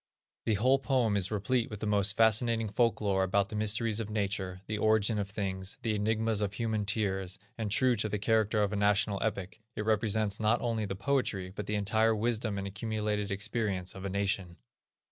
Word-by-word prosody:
The 110 - +3
whole 130 +6 +3
poem 130 -6 +1
is 95 -2 +2
replete 115 +4 0
with 105 - -7
the - - -3
most 100 -1 +2
fascinating 115 0 +3
folk 115 +2 +1
lore 100 -2 +1
about 100 +2 +1
the - - -6
mysteries 110 +1 +1
of 110 -2 -4
nature, 100 -3 -2
the 105 -1 -3
origin 110 0 +3
of 100 -1 -3
things, 95 -2 -4
the 115 - 0
enigmas 110 +1 0
of 100 -1 -1
human 110 -2 -1
tears, 95 -3 -1 0.2
and, 110 -2 -3
true 125 +4 +3
to 110 +1 -1
the 105 - -1
character 110 0 +2
of 100 +1 -1
a - - 0
national 100 0 +2
epic, 100 -1 -3
it 105 - -3
represents 110 -1 +1
not 110 +2 +2
only 115 -3 -1
the 95 - -4
poetry, 100 -5 -1
but 105 - -5
the 105 - -1
entire 110 +2 +2
wisdom 110 -1 -1
and 100 - -3
accumulated 105 0 -2
experience 100 -3 -2
of 95 - -9
a 100 - -3
nation. 100 -3 -1
105 Hz, 200 wpm, -30 LUFS, 100-110 Hz, 0.2 s, The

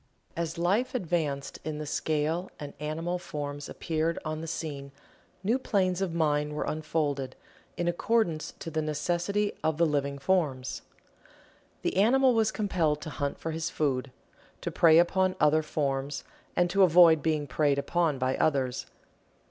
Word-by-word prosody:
As 165 -1 -3
Life 200 +10 +1
advanced 160 - -2
in 155 -1 -4
the 150 - -4
scale 155 +4 -1
and 145 -1 -7
animal 165 +4 -2
forms 145 -3 -5
appeared 165 0 -1
on 155 0 -3
the 165 - -6
scene 145 -4 -5 0.5
new 230 +7 +2
planes 190 -6 +1
of 190 -3 0
mind 150 -2 +1
were 150 - -2
unfolded, 150 -4 -2 0.4
in 175 - -1
accordance 175 -2 0
to 165 - -7
the 155 0 0
necessity 175 +7 0
of 160 -1 +1
the 170 - +4
living 140 -2 0
forms. 140 -4 0 1.0
The - - -1
animal 255 +6 +5
was 220 -1 +2
compelled 170 -8 0
to 155 - -6
hunt 145 -1 -3
for 160 - -4
his 160 0 -2
food 135 -3 -1 0.5
to - - -3
prey 165 -2 +6
upon 185 +2 +3
other 155 +1 +4
forms, 140 -2 -2 0.3
and 175 - +3
to 195 - +3
avoid 170 -3 +7
being 155 -1 0
preyed 145 -1 +1
upon 160 0 +1
by 130 0 0
others. 135 -5 0
160 Hz, 155 wpm, -28 LUFS, 145-175 Hz, 1.0 s, avoid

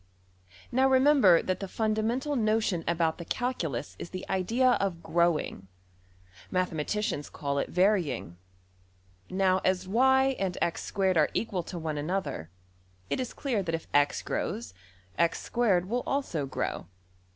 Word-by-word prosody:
Now 265 +2 +3
remember 260 - +5
that 185 - -1
the 195 - -4
fundamental 225 +8 -1
notion 215 -6 +1
about 165 -1 +1
the - - -5
calculus 165 - -3
is - - -6
the 185 0 -7
idea 230 +8 +2
of 195 -3 0
\emph{growing}. 170 - 0 0.8
Mathematicians 180 0 -1
call 140 -1 -2
it - - -3
\emph{varying}. 180 - +1 1.0
Now 185 0 +2
as 185 0 +1
$y$~and~$x^2$ 200 -6 +1
are 150 - +4
equal 200 -5 -1
to 175 +1 -7
one 155 -2 -3
another, 155 - -3 0.6
it - - 0
is 255 -2 -3
clear 250 -8 -1
that 165 -3 -1
if 165 - -7
$x$~grows, 145 - 0 0.5
$x^2$~will 200 +4 +1
also 175 - -1
grow. 130 - -3
190 Hz, 120 wpm, -29 LUFS, 165-230 Hz, 1.0 s, remember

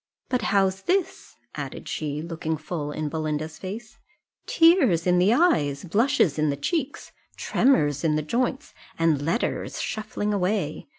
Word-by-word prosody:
But 250 -1 0
how's 195 -1 +2
this?" 370 - -1 0.2
added - - -7
she, 150 0 -3
looking 160 -1 -3
full 150 -1 -5
in 155 +1 -3
Belinda's 155 0 -3
face 215 +4 -8 0.5
"tears 310 - +4
in 180 -1 +3
the 185 +4 +4
eyes! 150 - +2
blushes 185 - +2
in 155 0 +2
the 140 - -1
cheeks! 290 - -3 0.3
tremors 150 - +2
in 155 -2 +2
the 155 - -1
joints! 245 - -2 0.2
and 165 -4 +2
letters 165 +11 -2
shuffling 210 -1 -3
away! 190 -5 -1
175 Hz, 140 wpm, -25 LUFS, 155-225 Hz, 0.5 s, tears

